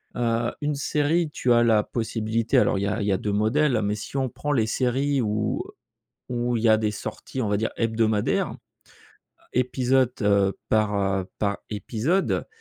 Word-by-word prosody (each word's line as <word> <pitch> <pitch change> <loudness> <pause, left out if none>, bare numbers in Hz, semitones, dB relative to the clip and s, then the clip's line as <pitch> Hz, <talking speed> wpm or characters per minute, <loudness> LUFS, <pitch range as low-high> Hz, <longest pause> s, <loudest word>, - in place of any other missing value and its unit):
Heu, 120 -1 0
une 150 0 0
série, 150 +3 +1
tu 125 - 0
as 120 0 +5
la 110 -2 +4
possibilité 115 0 -1
alors, 95 - +3
il - - -2
y - - 0
a 105 +3 -1
il - - -1
y - - +2
a 95 - +2
2 105 +2 -3
modèles, 120 +5 +2
mais, 105 +1 0
si 105 +5 -8
on 130 -1 0
prend 145 +5 -4
les 115 -5 +2
séries 135 +4 +1
où 105 -1 -1 0.7
où 120 -1 0
il 110 - -3
y 115 - +5
a 110 - +6
des 110 -1 0
sorties, 130 +5 -6
on 110 - -1
va 105 - +2
dire, 110 +2 -1
hebdomadaires, 110 -2 +1 1.0
épisode, 125 0 +2
heu, 100 -1 +2
par, 110 -1 +2
heu, 95 -1 0
par, 100 -1 0
épisode, 120 - -1
115 Hz, 185 wpm, -25 LUFS, 105-130 Hz, 1.0 s, a